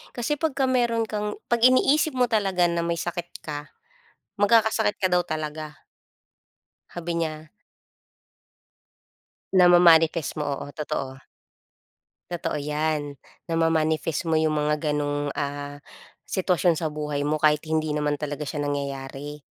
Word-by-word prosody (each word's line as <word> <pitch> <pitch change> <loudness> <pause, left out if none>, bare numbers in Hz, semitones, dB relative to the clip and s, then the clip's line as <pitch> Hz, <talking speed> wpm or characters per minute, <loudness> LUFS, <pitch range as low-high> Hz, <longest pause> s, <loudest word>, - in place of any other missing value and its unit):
Kasi 250 +5 -1
pagka 280 -4 +1
meron 240 -3 +1
kang 210 -1 -3
pag-iniisip 255 +4 +3
mo 250 - +4
talaga 195 -6 +1
na 170 0 0
may 170 0 -1
sakit 175 0 -4 0.2
ka, 145 -1 -6 0.7
magkakasakit 220 0 +3
ka 195 - -1
daw 180 0 +3
talaga. 155 -2 -6 1.1
Sabi 175 0 -5
niya. 155 -1 -5 2.0
Nama-manifest 175 -3 +5
mo, 150 - -2
oo. 140 0 -4
Totoo. 135 -3 -5 1.1
Totoo 175 -3 -3
'yan, 150 0 -2 0.3
nama-manifest 165 -1 +1
mo 160 - +2
yung 155 -1 +2
mga 150 0 0
gano'ng, 145 -1 -1
ah, 145 0 -4 0.5
sitwasyon 180 -3 +1
sa 160 - -1
buhay 150 -1 -2
mo 150 - +1
kahit 150 -1 +4
hindi 155 -1 0
naman 150 -1 0
talaga 150 0 -4
siya 145 - -3
nangyayari, 140 0 -4
160 Hz, 120 wpm, -25 LUFS, 150-180 Hz, 2.0 s, Nama-manifest